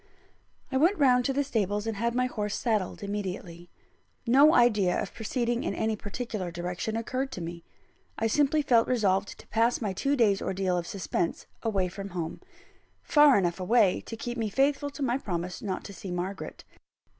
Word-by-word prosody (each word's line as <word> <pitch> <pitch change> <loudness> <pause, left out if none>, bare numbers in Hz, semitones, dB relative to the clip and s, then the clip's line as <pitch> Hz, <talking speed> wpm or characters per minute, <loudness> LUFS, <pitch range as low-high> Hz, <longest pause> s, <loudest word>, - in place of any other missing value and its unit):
I 265 - +1
went 340 +9 +3
round 250 -4 +4
to - - +2
the 285 +1 +1
stables, 210 -5 -1
and 225 -2 -3
had 235 +2 -1
my 250 0 +2
horse 210 -4 -3
saddled 215 -5 -1
immediately. 185 -4 -5 0.6
No 275 +6 +6
idea 210 -7 +4
of - - -4
proceeding 240 +1 -1
in - - -2
any 220 0 0
particular 210 -2 -5
direction 175 +6 -3
occurred 255 +4 -2
to - - -5
me. 170 0 -6 0.5
I 225 - -1
simply 290 +6 +2
felt 235 -4 +4
resolved 200 -5 +1
to - - -15
pass 230 +2 +2
my 205 -5 -2
two 275 +9 0
days' 210 -6 +3
ordeal 190 -1 -1
of 175 -1 -2
suspense 180 -3 -2 0.2
away 200 -5 0
from 195 +2 -7
home 165 -1 -4 0.6
far 295 -4 +6
enough 175 -2 0
away 195 0 +3
to 225 - -6
keep 240 +1 -4
me 220 -2 -1
faithful 280 +5 +1
to 285 0 -6
my 255 0 +1
promise 180 -5 -4
not 190 -3 -3
to 200 - -9
see 190 - -8
Margaret. 180 +2 -5
215 Hz, 180 wpm, -28 LUFS, 190-250 Hz, 0.6 s, No